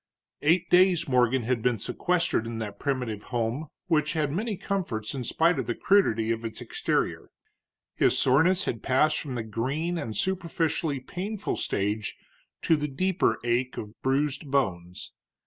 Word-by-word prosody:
Eight 170 +4 +3
days 180 -2 +5
Morgan 125 -1 +3
had 120 0 0
been 125 0 +1
sequestered 170 - 0
in 115 -1 -4
that 105 -3 -5
primitive 125 -7 -2
home, 120 +5 -2 0.2
which 155 -4 +1
had 150 -3 0
many 210 +5 -2
comforts 165 - -3
in 130 -2 -3
spite 165 +8 +2
of - - -3
the 120 - -1
crudity 115 - +3
of 115 0 -2
its 115 -1 -5
exterior. - - -1 0.6
His - - +2
soreness 165 +9 +3
had 115 - -3
passed 145 +4 +2
from 135 -4 -5
the 115 - -2
green 140 +11 -2
and 110 -7 -4
superficially 165 - -1
painful 195 +9 -4
stage 105 +2 -2 0.5
to 165 - +4
the 150 -1 -2
deeper 185 +7 +1
ache 120 +2 0
of 105 0 -6
bruised 140 +2 0
bones. 90 -10 -1
135 Hz, 155 wpm, -27 LUFS, 115-170 Hz, 0.6 s, days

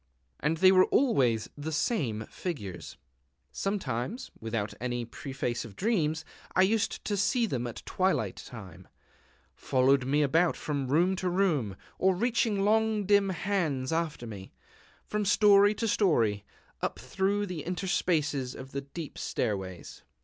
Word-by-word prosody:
And 150 +3 0
they 185 +3 +7
were 185 -1 +6
always 130 - +2
the 150 +2 -5
same 135 - -1
figures.... 105 - -6 0.5
Sometimes, 195 - -3
without 110 -2 -3
any 120 -1 -2
preface 125 0 -4
of 110 -5 -11
dreams, 160 - 0 0.3
I 185 - +6
used 210 +2 0
to 205 - 0
see 230 +5 +2
them 125 - -2
at 120 - -8
twilight 185 - 0
time, 95 -6 -10 0.7
following 130 0 +2
me 150 +2 +3
about 165 +5 +3
from 140 -3 -2
room 175 +8 +3
to 185 0 -1
room, 165 - +1 0.2
or 190 0 +3
reaching 220 -1 +1
long 220 -1 +2
dim 200 0 +4
hands 170 -8 -1
after 160 -6 -2
me, 100 -4 -9 0.5
from 210 0 -1
story 205 0 +5
to 225 - -1
story, 115 - +2 0.4
up - - -2
through 200 +2 -1
the 180 -5 -5
interspaces 160 -7 -1
of 130 +1 -9
the 140 - -3
deep 145 +2 -8
stairways. 95 -4 -3
160 Hz, 140 wpm, -29 LUFS, 125-195 Hz, 0.7 s, they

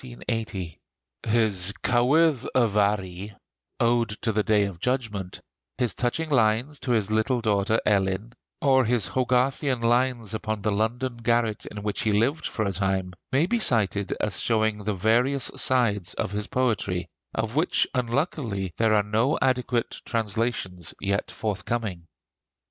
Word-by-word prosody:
His 110 -3 -2
'Cywydd 130 +3 +3
y 125 -2 +5
Faru' 100 -2 0 0.5
(Ode 120 0 +2
to 115 - +1
the 105 0 +1
Day 105 -1 +3
of 95 -4 -6
Judgment), 110 -6 -2 0.4
his 125 -2 0
touching 150 +6 -2
lines 120 +3 +2
to - - -6
his 110 -2 +1
little 110 +4 +1
daughter 110 0 +1
Elin, 100 +2 0 0.3
or 135 -2 +5
his 115 -6 0
Hogarthian 130 +1 +1
lines 120 -1 +1
upon 110 -1 -3
the 110 - +1
London 120 +4 -1
garret 115 -2 0
in 105 -1 -7
which 105 -1 -1
he 110 -3 +1
lived 120 +10 +1
for 110 - -2
a 100 - 0
time, 95 -1 -1 0.2
may 140 +5 +3
be 235 +6 0
cited 100 - +2
as 105 -4 0
showing 110 -2 +1
the 105 -1 0
various 120 +7 +2
sides 105 -8 +1
of - - -2
his 105 0 -3
poetry, 100 -8 -1 0.3
of 110 +2 -2
which 160 +4 +2
unluckily 120 - -1
there 110 -1 +4
are 105 - +3
no 110 +7 +1
adequate 125 -2 0
translations 110 -6 -2
yet 100 +1 -1
forthcoming. 105 -4 -3
110 Hz, 145 wpm, -25 LUFS, 100-125 Hz, 0.5 s, y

